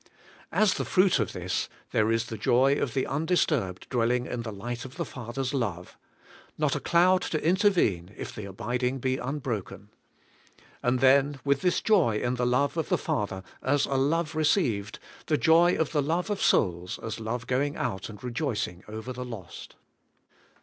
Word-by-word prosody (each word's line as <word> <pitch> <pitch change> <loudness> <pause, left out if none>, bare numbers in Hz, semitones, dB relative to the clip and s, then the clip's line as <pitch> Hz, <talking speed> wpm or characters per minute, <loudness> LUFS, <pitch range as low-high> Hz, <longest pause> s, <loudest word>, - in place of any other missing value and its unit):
As 215 -3 +3
the - - -2
fruit 185 -6 +3
of 110 - 0
this, 90 0 -2 0.2
there 110 +1 +2
is 115 +1 +1
the 115 - -6
joy 130 +5 +4
of 140 -3 -2
the 130 - +1
undisturbed 145 - 0
dwelling 120 0 +1
in 120 - -4
the 115 -1 -5
light 120 +4 -5
of 130 +1 -10
the - - -2
Father's 130 +1 -4
love, 100 -10 -3 0.3
— - - -24
not 150 -2 +1
a - - -1
cloud 180 +5 +4
to 155 -2 -2
intervene 170 - +2
if - - -6
the 105 - -7
abiding 125 +6 -2
be 130 0 -1
unbroken. 125 -7 -4 0.9
And 125 +1 +1
then, 135 +1 +4
with 140 -1 +2
this 180 - +1
joy 175 - +3
in 120 - -1
the 125 -1 0
love 140 +6 +1
of 160 - -1
the - - +3
Father, 95 -2 -2 0.2
as 145 +2 +2
a - - -3
love 155 +5 +1
received, 135 - +1 0.3
the 155 - +2
joy 170 +3 +5
of 160 - 0
the 150 - +2
love 170 +7 -1
of 205 - -2
souls, 90 -2 +1
as 115 0 -4
love 115 +2 -3
going 140 +3 0
out 110 -5 -3
and 105 +1 -11
rejoicing 120 - -3
over 110 +4 -6
the 125 0 -5
lost. 115 -8 -9
125 Hz, 180 wpm, -27 LUFS, 110-150 Hz, 0.9 s, joy